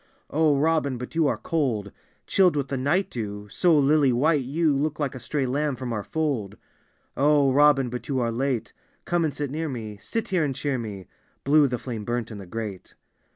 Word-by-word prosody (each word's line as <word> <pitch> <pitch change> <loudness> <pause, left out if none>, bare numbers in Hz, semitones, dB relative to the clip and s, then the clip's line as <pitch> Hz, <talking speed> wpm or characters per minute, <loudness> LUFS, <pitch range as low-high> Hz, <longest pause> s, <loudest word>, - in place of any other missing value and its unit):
"O 155 -1 +3
Robin, 150 -3 +1
but 125 +1 -7
you 165 -2 +2
are - - 0
cold 120 -11 -1 0.2
— - - -40
Chilled 185 -4 +3
with 140 -2 -1
the 135 - -1
night 145 +9 0
dew; 105 -3 -5
so 175 -4 +3
lily 145 -1 +4
white 145 +5 +2
you 150 +4 +1
Look 150 +2 -1
like 145 -3 -1
a 130 - -7
stray 140 +1 -2
lamb 140 +2 0
from 125 -1 -4
our 105 - -2
fold. 140 -11 -2 0.3
" - - -41 0.2
O 145 -1 +4
Robin, 140 -1 +5
but 125 0 -6
you 135 -2 0
are 120 -1 0
late: 125 0 -2 0.3
Come 175 -1 +1
and 155 - +1
sit 145 -2 -4
near 160 +2 -2
me 110 -5 -6
— - - -25
sit 225 -2 -3
here 185 -4 +2
and 140 -3 -1
cheer 140 -2 -1
me." 100 -5 -7 0.2
— - - -40
(Blue 145 +1 +5
the 125 -2 -2
flame 115 -3 -6
burnt 120 +1 -3
in 105 - -7
the 95 - -10
grate.) 105 -1 -6
135 Hz, 225 wpm, -25 LUFS, 120-150 Hz, 0.3 s, Robin